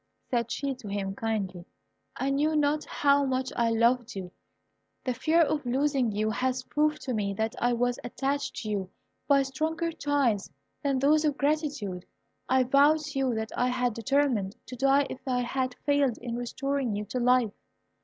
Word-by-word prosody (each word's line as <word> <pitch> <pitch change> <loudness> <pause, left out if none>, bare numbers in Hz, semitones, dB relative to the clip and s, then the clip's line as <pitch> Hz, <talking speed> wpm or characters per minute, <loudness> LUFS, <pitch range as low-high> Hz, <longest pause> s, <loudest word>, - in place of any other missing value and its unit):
said 235 -2 0
she 275 +2 -2
to 250 -4 -11
him, 200 -1 -2
kindly; 200 -5 -3 0.5
"I 270 +1 -1
knew 300 +3 +1
not 300 0 +1
how 285 0 +3
much 260 -1 -1
I 235 -1 +2
loved 235 +1 +2
you. 185 -2 -6 0.7
The 255 - -1
fear 315 +7 +3
of 305 -2 +1
losing 265 -1 +1
you 215 +1 0
has 255 +2 -1
proved 300 +3 0
to 255 - -2
me 200 -3 -1
that 220 +2 -1
I 245 0 +3
was 245 +1 0
attached 275 +3 -2
to 215 - -4
you 195 -3 -2 0.4
by 275 -1 +5
stronger 320 +5 -2
ties 280 -10 0 0.3
than 275 -2 +1
those 300 +4 +4
of 295 -2 +1
gratitude. 285 - -1 0.5
I 260 0 +4
vow 280 +4 +5
to 300 -3 -4
you 260 -3 +1
that 220 0 -3
I 250 - +2
had 250 -1 0
determined 230 -5 +1
to 255 - -8
die 275 +2 +3
if - - -7
I 250 -1 +1
had 255 +1 -2
failed 285 -4 +2
in 235 -1 -5
restoring 260 0 -2
you 210 +1 -3
to 250 - -3
life." 250 -3 +3
255 Hz, 180 wpm, -28 LUFS, 230-280 Hz, 0.7 s, by